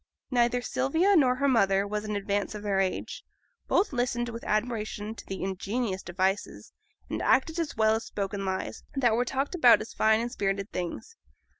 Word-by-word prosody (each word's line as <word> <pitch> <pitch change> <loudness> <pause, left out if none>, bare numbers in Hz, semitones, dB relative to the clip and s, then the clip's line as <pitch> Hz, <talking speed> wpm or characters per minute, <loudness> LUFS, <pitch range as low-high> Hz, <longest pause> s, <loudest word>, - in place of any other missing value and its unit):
Neither 245 0 +2
Sylvia 320 +13 +2
nor 260 -6 +4
her 280 +2 +1
mother 200 -6 +3
was 210 +1 -3
in 210 -1 -3
advance 200 +1 -2
of 210 - -7
their 200 -2 +1
age. 190 -1 -2 0.4
Both 375 -4 +2
listened 240 -1 -1
with 230 0 -7
admiration 215 -1 -2
to - - -10
the 195 - -5
ingenious 195 +2 -2
devices, 190 +3 -2 0.3
and - - -3
acted 320 +6 +2
as 325 -8 -3
well 220 0 +4
as 225 - -2
spoken 200 0 -4
lies, 190 -1 -3
that 245 -4 +3
were 245 +2 +1
talked 270 +5 -2
about 255 -10 +6
as 215 - -7
fine 220 0 +3
and 240 +1 -3
spirited 200 -3 -2
things. 180 - -5
220 Hz, 180 wpm, -28 LUFS, 200-250 Hz, 0.4 s, about